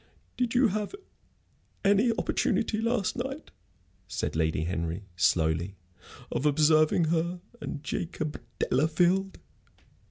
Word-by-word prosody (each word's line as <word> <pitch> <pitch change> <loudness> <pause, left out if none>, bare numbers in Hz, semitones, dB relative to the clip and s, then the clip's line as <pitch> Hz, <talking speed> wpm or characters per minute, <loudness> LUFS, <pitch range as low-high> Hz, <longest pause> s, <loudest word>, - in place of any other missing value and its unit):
"Did 245 -1 -1
you 250 -1 +5
have 210 - -3 0.9
any 205 +4 +4
opportunity 215 -1 0
last 230 -3 0
night," 270 +4 -5 0.6
said - - -3
Lady 80 -1 +1
Henry, 85 +2 -3
slowly, 85 0 +1 0.6
"of 130 +5 +1
observing 155 +2 +4
her 170 +2 0 0.2
and 145 - -5
Jacob 155 -1 -3 0.2
Delafield?" 175 +7 +2
160 Hz, 100 wpm, -28 LUFS, -, 0.9 s, you